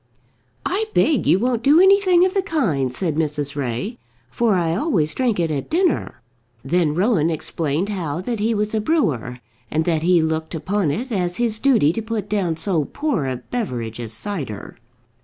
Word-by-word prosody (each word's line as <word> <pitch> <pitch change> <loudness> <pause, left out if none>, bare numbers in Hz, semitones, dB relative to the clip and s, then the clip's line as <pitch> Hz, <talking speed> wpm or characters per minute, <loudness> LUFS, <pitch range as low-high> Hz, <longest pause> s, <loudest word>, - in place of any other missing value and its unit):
"I 405 +4 0
beg 290 - +3
you - - +5
won't 240 +2 0
do 285 +6 +5
anything 380 -2 +5
of 375 - 0
the 390 - +2
kind," 195 - 0
said 155 +2 -2
Mrs. 150 -2 -1
Ray, 140 - -3 0.3
"for 225 - +2
I 170 -2 +1
always 180 - +1
drink 240 -7 0
it 165 -2 0
at 140 -3 -3
dinner." 345 - 0 0.4
Then 155 0 +1
Rowan 180 -4 +2
explained 160 +2 -2
how 170 -6 -3
that 230 +3 -3
he 225 +2 +1
was 210 +1 -1
a 220 - +1
brewer, 145 - 0 0.3
and 160 +1 0
that 165 -3 +1
he 170 0 +3
looked 160 +1 -2
upon 185 +1 -1
it 240 - -3
as 180 -4 -1
his 230 -3 0
duty 225 - +3
to 225 - -3
put 220 -2 -4
down 195 -6 0
so 165 -3 0
poor 285 - -2
a 130 - -1 0.2
beverage 120 - -3
as 115 -2 -5
cider. 130 - -5
180 Hz, 180 wpm, -21 LUFS, 155-235 Hz, 0.4 s, you